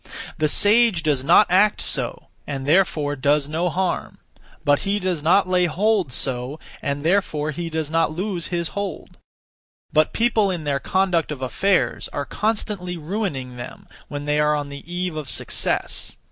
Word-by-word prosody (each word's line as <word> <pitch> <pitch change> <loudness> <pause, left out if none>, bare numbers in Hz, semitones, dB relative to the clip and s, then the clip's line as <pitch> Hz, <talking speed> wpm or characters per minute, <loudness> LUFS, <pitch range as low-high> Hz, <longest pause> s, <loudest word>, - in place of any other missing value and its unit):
The 155 - +3
sage 205 +1 +5
does 145 -5 +1
not 170 +8 +6
act 205 +3 +4
(so), - - -1 0.2
and 135 -2 -4
therefore 150 -3 +2
does 145 +1 +1
no 165 +4 -1
harm; 185 +2 -2 0.6
he 200 +1 -1
does 180 -5 -1
not 180 +5 +3
lay 180 -1 +2
hold 190 -1 +1
(so), 130 +3 -2 0.2
and 140 0 -3
therefore 155 -4 +1
does 160 -1 -4
not 165 0 +2
lose 180 +1 -3
his 170 -2 -2
hold. 200 -1 -6 0.7
(But) 155 0 +3
people 225 -3 +2
in 175 -4 -3
their 140 -2 0
conduct 185 -1 0
of 135 -3 -5
affairs 190 +9 +1
are 145 - -4
constantly 205 -5 -2
ruining 150 - -4
them 120 - -9 0.2
when 145 0 -6
they 150 0 +1
are 150 0 +3
on 145 -1 -3
the 140 +4 -10
eve 180 -1 -2
of 150 -4 -5
success. - - -1
165 Hz, 160 wpm, -22 LUFS, 145-190 Hz, 0.7 s, not